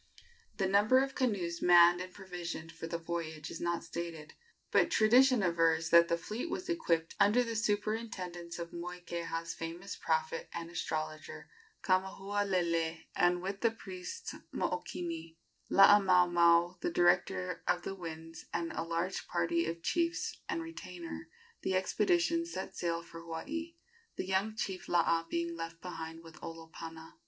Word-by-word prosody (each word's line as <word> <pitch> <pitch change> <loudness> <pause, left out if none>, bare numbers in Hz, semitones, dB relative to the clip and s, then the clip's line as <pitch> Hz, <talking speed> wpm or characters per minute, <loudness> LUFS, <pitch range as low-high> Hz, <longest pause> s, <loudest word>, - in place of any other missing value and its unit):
The 195 - +1
number 205 +6 +5
of 270 0 -4
canoes 190 -10 -1
manned 175 0 +7
and 185 0 -6
provisioned 175 -4 -6
for 165 0 -7
the 170 - -2
voyage 165 -2 -5
is - - -7
not 170 0 -1
stated; 165 -2 -6 0.4
but - - +4
tradition 245 +1 +5
avers 165 -2 +2
that 170 0 +8
the 170 - +1
fleet 215 - -4
was 370 +1 -4
equipped 170 - 0
under 210 +5 +5
the 230 -1 -4
superintendence 205 -5 -2
of 170 -1 -6
Moikeha's 170 -1 -4
famous 170 +4 -6
prophet 160 0 -1
and 170 0 -5
astrologer, 155 - -4 0.3
Kamahualele; 185 -4 0
and, 175 0 +3
with 195 +1 -4
the 230 - +4
priest 185 -5 -7 0.2
Mookini, 165 -2 -3 0.3
Laamaomao, 180 -3 +6
the - - -1
director 175 - +2
of 175 - +1
the 195 - -3
winds, 165 -3 -8
and 170 -1 -2
a - - -3
large 170 +3 -2
party 170 -1 +1
of 165 0 -4
chiefs 340 0 0
and 335 -3 -1
retainers, 180 - -8 0.3
the 190 - 0
expedition 335 - +2
set 190 - -6
sail 170 -1 -1
for 165 0 -10
Hawaii, 300 - -5 0.4
the - - -3
young 195 +3 0
chief 190 -4 -4
Laa 170 -1 +3
being 170 0 -1
left 165 0 -6
behind 165 -2 -7
with 165 -1 -14
Olopana. 165 0 -9
175 Hz, 145 wpm, -33 LUFS, 165-195 Hz, 0.4 s, that